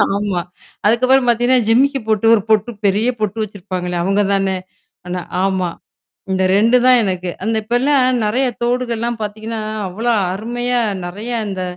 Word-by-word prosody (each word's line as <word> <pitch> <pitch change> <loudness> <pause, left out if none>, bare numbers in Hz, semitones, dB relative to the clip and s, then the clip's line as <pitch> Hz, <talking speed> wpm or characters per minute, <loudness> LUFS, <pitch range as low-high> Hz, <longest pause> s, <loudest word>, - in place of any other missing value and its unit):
ஆமா. 200 -3 -1 0.4
அதுக்கப்புறம் 255 +4 +4
பார்த்தீங்கன்னா, 240 +1 +3
ஜிமக்கு 270 +4 +3
பொட்டு 215 0 +1
ஒரு 215 - +3
பொட்டு 220 +2 +2
பெரிய 205 +4 +2
பொட்டு 215 0 -2
வச்சிருப்பாங்களே! 185 -3 -5
அவங்க 195 +3 +2
தானே. 195 -1 +1 0.5
ஆனா 180 0 -3 0.2
ஆமா. 190 -2 0 0.6
இந்த 190 0 +1
2 230 +5 +4
தான் 250 -1 +6
எனக்கு. 185 -2 -2
அந்த 220 +2 0
இப்பல்லாம் 255 +2 +2
நெறைய 250 +6 +1 0.2
தோடுகள்லாம் 240 -1 -1
பார்த்தீங்கன்னா, 220 +1 -4 0.3
அவ்ளோ 225 +6 -1 0.2
அருமையா 240 +4 -2 0.3
நறைய 205 +7 -6 0.2
இந்த 190 -2 -4
220 Hz, 140 wpm, -18 LUFS, 195-245 Hz, 0.6 s, தான்